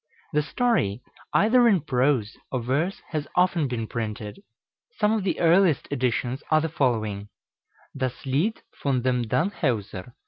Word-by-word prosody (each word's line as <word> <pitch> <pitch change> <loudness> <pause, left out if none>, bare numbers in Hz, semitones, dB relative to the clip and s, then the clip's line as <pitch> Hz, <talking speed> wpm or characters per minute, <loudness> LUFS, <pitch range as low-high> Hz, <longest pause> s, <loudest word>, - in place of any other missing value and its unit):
The 150 - +3
story, 150 - 0 0.3
either 240 +3 +5
in 195 -7 +4
prose 130 -5 +1 0.2
or 130 -3 -2
verse, 145 +10 -1
has 155 -2 -3
often 180 -4 +3
been 120 -3 -3
printed. 110 - -5 0.6
Some 210 -1 +2
of 220 -3 0
the 190 - -1
earliest 170 -2 +4
editions 125 -1 -1
are 155 - +5
the 160 - -1
following: 110 -7 -1 0.7
"Das 130 -1 -3
Lied 155 +12 0 0.2
von 130 -4 +1
dem 125 -2 +1
Danhewser." 120 - -2
135 Hz, 140 wpm, -25 LUFS, 120-175 Hz, 0.7 s, either